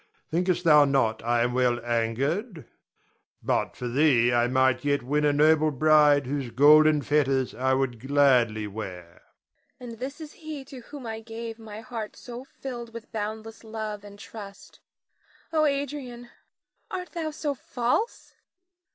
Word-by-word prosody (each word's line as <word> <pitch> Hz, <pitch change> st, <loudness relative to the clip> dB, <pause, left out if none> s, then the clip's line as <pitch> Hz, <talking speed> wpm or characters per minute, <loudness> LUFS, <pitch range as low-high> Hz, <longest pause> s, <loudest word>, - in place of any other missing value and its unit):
Thinkest 175 Hz, +1 st, 0 dB
thou 150 Hz, -3 st, +7 dB
not 130 Hz, -6 st, +1 dB
I 120 Hz, 0 st, +2 dB
am 120 Hz, 0 st, -1 dB
well 125 Hz, -1 st, +2 dB
angered? 135 Hz, -, -1 dB, 0.8 s
But -, -, 0 dB
for 125 Hz, -, -5 dB
thee 120 Hz, -2 st, +3 dB
I 120 Hz, 0 st, +3 dB
might 130 Hz, -1 st, +2 dB
yet 145 Hz, -2 st, +1 dB
win 150 Hz, +4 st, 0 dB
a 150 Hz, -, +4 dB
noble 155 Hz, +1 st, +4 dB
bride 150 Hz, 0 st, +4 dB
whose 135 Hz, -1 st, -3 dB
golden 150 Hz, +3 st, +6 dB
fetters 135 Hz, -3 st, +1 dB
I 130 Hz, +1 st, +1 dB
would 130 Hz, -3 st, -1 dB
gladly 125 Hz, -5 st, +3 dB
wear. 95 Hz, -5 st, -8 dB, 0.6 s
Nina. 245 Hz, -2 st, -8 dB
And 230 Hz, -, -11 dB
this 275 Hz, +5 st, -6 dB
is 310 Hz, -2 st, -9 dB
he 310 Hz, -4 st, -8 dB
to 265 Hz, -1 st, -10 dB
whom 270 Hz, +2 st, -10 dB
I 220 Hz, -1 st, -5 dB
gave 225 Hz, 0 st, -7 dB
my 220 Hz, -1 st, -9 dB
heart 225 Hz, -3 st, -6 dB
so 245 Hz, 0 st, -9 dB
filled 240 Hz, -4 st, -8 dB
with 230 Hz, -, -9 dB
boundless 220 Hz, +1 st, -5 dB
love 215 Hz, -2 st, -6 dB
and 205 Hz, 0 st, -12 dB
trust. 200 Hz, -1 st, -11 dB, 0.7 s
Oh, 310 Hz, -1 st, +3 dB
Adrian, 275 Hz, -4 st, -3 dB, 0.6 s
art 365 Hz, -1 st, -5 dB
thou 325 Hz, -3 st, -3 dB
so 300 Hz, -1 st, -3 dB
false? 250 Hz, -, -2 dB
155 Hz, 150 wpm, -26 LUFS, -, 0.8 s, thou